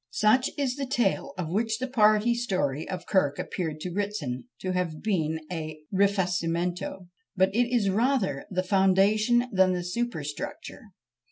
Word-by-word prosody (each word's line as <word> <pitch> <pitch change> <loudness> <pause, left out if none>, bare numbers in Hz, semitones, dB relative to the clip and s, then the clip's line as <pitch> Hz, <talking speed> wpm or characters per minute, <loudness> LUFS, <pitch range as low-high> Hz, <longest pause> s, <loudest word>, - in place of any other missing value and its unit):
Such 235 +5 +4
is 275 -2 -1
the 275 -1 -3
tale 240 -7 0
of 170 -3 -3
which 220 +3 0
the 260 +2 -3
party 215 -2 +4
story 185 - -1
of 185 -1 -5
Kirk 145 -8 +1
appeared 160 -4 -4
to 180 - -4
Ritson 170 - -3 0.2
to 185 - -2
have 180 -4 -2
been 160 -7 0
a 155 -2 -4 0.2
rifacimento; 180 -2 0 0.3
but 190 0 +2
it 240 +2 +1
is 215 -6 +2
rather 215 - 0
the 185 -1 -1
foundation 200 +5 +3
than 190 -1 +4
the 180 -1 -2
superstructure. 175 -7 -4
190 Hz, 150 wpm, -27 LUFS, 175-220 Hz, 0.3 s, Such